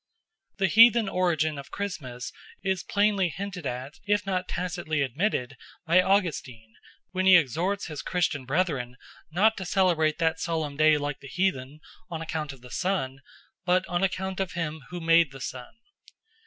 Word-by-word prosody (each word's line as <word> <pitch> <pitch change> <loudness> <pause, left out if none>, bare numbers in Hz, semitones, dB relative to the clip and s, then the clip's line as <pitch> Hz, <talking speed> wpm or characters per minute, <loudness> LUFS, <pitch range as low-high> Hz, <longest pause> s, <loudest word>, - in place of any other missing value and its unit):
The 195 - +2
heathen 230 +3 +6
origin 160 -5 0
of 140 - -10
Christmas 130 -12 -5 0.3
is 190 -2 0
plainly 200 -3 +2
hinted 180 -2 -5
at, 130 +3 -6
if 205 -1 +1
not 185 -2 -1
tacitly 175 -5 -2
admitted, 135 - -1 0.3
by 175 +2 +5
Augustine 150 - -1 0.4
when 185 0 0
he 190 - +9
exhorts 175 - 0
his 155 -3 -6
Christian 165 -6 -1
brethren 135 -5 -1 0.3
not 210 +7 +3
to 190 - -4
celebrate 175 -5 +2
that 160 -1 +1
solemn 160 -4 -2
day 155 0 +5
like 145 -1 -3
the 140 - -11
heathen 150 -4 -2 0.3
on 165 -2 -4
account 155 -2 -4
of 135 -3 -14
the 125 0 -13
sun, 175 -9 -1 0.4
but 185 +1 +2
on 175 +1 -1
account 190 0 -1
of 190 -2 -2
him 160 -2 -3
who 180 - -5
made 165 -2 +4
the 135 - -10
sun. 125 - -7
170 Hz, 160 wpm, -27 LUFS, 145-190 Hz, 0.4 s, he